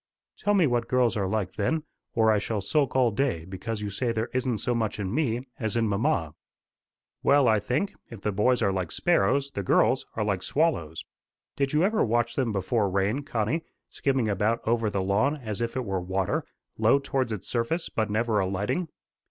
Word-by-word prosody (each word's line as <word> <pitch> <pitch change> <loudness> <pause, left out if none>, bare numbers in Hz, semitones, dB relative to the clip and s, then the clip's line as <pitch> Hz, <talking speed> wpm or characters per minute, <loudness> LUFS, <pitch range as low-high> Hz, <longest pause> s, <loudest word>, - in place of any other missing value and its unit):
"Tell 205 0 +1
me 185 -4 +5
what 120 -4 0
girls 125 -3 +2
are 100 -3 0
like, 100 -2 -2
then, 155 +10 0 0.3
or 110 -1 +4
I 105 - +3
shall 105 +1 -2
sulk 135 +8 0
all 125 -3 +4
day 105 -9 -1
because 105 +4 -5
you 105 -1 -3
say 120 +4 -1
there 110 0 -2
isn't 130 -2 0
so 120 +4 -1
much 110 -2 -1
in 95 0 -2
me 125 -4 0
as 110 -3 -2
in 115 -1 +2
mamma." 100 - 0 0.9
"Well, 140 -2 +4
I 110 -1 +4
think, 125 - -1 0.2
if 115 - -9
the 105 - -1
boys 120 +6 +2
are 100 - +3
like 95 -3 -2
sparrows, 135 +8 +2
the 100 - -3
girls 95 - +2
are 110 - 0
like 100 -3 -1
swallows. 95 - 0 0.5
Did 140 0 0
you 155 +3 +3
ever 215 +3 +2
watch 120 +1 +1
them 130 -4 0
before 100 +1 0
rain, 100 +8 0
Connie, 135 +3 -1 0.3
skimming 130 -4 0
about 105 +3 0
over 115 -1 +2
the 100 -2 -1
lawn 105 +10 +2
as 110 -5 -4
if 115 +1 -2
it 130 -1 -2
were 95 -2 -1
water, 95 +1 -1 0.3
low 110 +4 +5
towards 135 -3 -1
its 105 -4 -5
surface, 125 +9 -1
but 110 -1 -1
never 110 0 +1
alighting? 100 - -1
115 Hz, 200 wpm, -27 LUFS, 100-130 Hz, 0.9 s, me